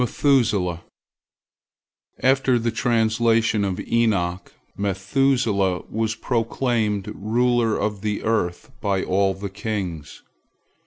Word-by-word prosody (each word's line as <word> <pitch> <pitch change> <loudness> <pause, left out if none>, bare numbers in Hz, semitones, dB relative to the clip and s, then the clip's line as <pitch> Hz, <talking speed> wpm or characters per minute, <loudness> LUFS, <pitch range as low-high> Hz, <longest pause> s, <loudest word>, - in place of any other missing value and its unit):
METHUSELAH 105 - +1 1.4
After 135 -1 +3
the 115 0 -1
translation 115 -2 +2
of 95 -2 -2
Enoch, 95 -6 0 0.2
Methuselah 100 -1 +1
was 110 0 -1
proclaimed 115 -3 -1
ruler 115 +2 +1
of 105 -2 -2
the 105 -1 -2
earth 105 -6 -1
by 95 -2 0
all 95 0 +1
the 100 +1 -5
kings. 95 -7 -5
110 Hz, 95 wpm, -23 LUFS, 95-115 Hz, 1.4 s, After